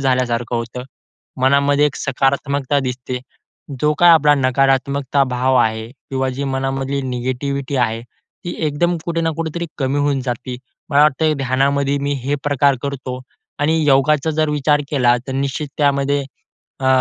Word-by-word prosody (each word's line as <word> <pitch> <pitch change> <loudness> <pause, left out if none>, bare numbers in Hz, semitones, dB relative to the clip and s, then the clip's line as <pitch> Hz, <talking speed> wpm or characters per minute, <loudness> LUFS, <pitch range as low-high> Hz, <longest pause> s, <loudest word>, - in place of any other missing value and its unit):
झाल्यासारखं 125 -3 0
होतं. 115 +2 -5 0.6
मनामध्ये 140 +2 +4
एक 145 - -3
सकारात्मकता 140 +1 0
दिसते. 125 -1 -4 0.6
जो 150 0 +3
काही 175 -1 +7
आपला 150 -2 +5
नकारात्मकता 135 +1 +1
भाव 130 +1 +1
आहे 110 -2 +1 0.2
किंवा 130 0 -1
जी 140 - -2
मनामधली 135 +1 -2
निगेटिव्हिटी 130 +2 -3
आहे, 115 -2 0
ती 175 +8 -11
एकदम 170 +4 0
कुठे 165 -1 -1
ना 165 - +1
कुठेतरी 165 +1 -3
कमी 135 0 0
होऊन 145 -2 +1
जाते. 125 0 -4 0.3
मला 145 0 +5
वाटतं 155 +1 +2
ध्यानामध्ये 140 +2 +1
मी 145 0 0
हे 145 +2 0
प्रकार 140 -1 +2
करतो. 130 -2 -4 0.4
आणि 160 +2 +1
योगाचा 145 +2 +3
जर 155 0 0
विचार 150 0 +2
केला 125 -4 +3
तर 135 - -4
निश्चित 140 +2 -2
त्यामध्ये 140 -1 +2 0.6
अ, 130 - -1
140 Hz, 145 wpm, -19 LUFS, 130-145 Hz, 0.6 s, काही